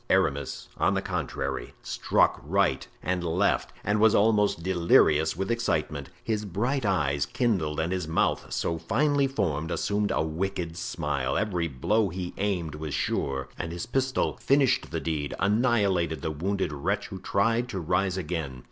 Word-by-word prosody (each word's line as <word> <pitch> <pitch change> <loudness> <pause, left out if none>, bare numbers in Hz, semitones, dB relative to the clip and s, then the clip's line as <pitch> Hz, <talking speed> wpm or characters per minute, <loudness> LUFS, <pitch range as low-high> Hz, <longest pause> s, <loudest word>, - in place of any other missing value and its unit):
Aramis, 70 -1 +1
on - - +2
the - - +1
contrary, - - -3
struck - - +1
right - - +1 0.2
and 90 +1 -1
left 90 +4 +1
and 105 +1 +1
was 110 0 +5
almost 105 -5 +3
delirious 85 -4 +4
with 95 +4 -1
excitement. 75 - -1
His 110 -2 -1
bright 115 +6 -1
eyes 70 -7 +1
kindled, 90 - 0
and 80 +2 0
his 90 -4 -2
mouth, 80 - 0
so 85 -1 -1
finely 140 - +2
formed, 85 - -1
assumed 105 +3 0
a - - +1
wicked 85 +1 -3
smile; 75 -6 -2
every 90 -6 0
blow 100 - +1
he 90 0 -5
aimed 90 -6 -1
was 75 -1 -4
sure, 65 -1 -1
and 80 - -3
his 85 0 -4
pistol 130 +1 0
finished 135 -2 +3
the 80 - -2
deed—annihilated 90 - +1
the 80 - -1
wounded 90 +2 -1
wretch 70 - -2
who 95 - -7
tried 115 +6 +1
to 95 - -3
rise 90 +2 0
again. 80 -7 -3
90 Hz, 155 wpm, -27 LUFS, 80-105 Hz, 0.2 s, was